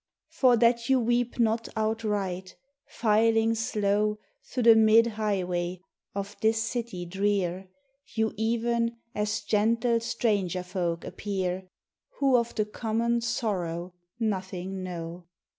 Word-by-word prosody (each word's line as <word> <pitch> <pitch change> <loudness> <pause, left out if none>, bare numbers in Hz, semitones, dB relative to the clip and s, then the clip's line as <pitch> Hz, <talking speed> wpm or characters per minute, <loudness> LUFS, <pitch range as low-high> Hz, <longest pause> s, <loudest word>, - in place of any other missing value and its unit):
For 250 -3 +4
that 235 +1 +3
you 265 -1 +5
weep 240 0 0
not 230 -1 +1
outright, 210 -4 -2 0.3
filing 225 0 +3
slow 210 -1 0 0.3
Thro' 250 - -3
the 230 -1 +8
mid 220 +1 +6
highway 185 -5 -1 0.4
of 200 +1 -4
this 220 0 +2
city 230 -6 -4
drear, 190 0 -1 0.5
You 220 -1 +1
even 230 +1 0 0.2
as 210 +1 -1
gentle 230 +2 +2
stranger 200 -6 0
folk 175 -2 -2
appear, 190 -2 -3 0.5
Who 275 -2 +3
of 235 -1 +1
the 215 - +1
common 230 +2 -1
sorrow 185 -7 -2 0.3
nothing 190 -3 -3
know! 175 -1 -6
215 Hz, 115 wpm, -27 LUFS, 185-230 Hz, 0.5 s, the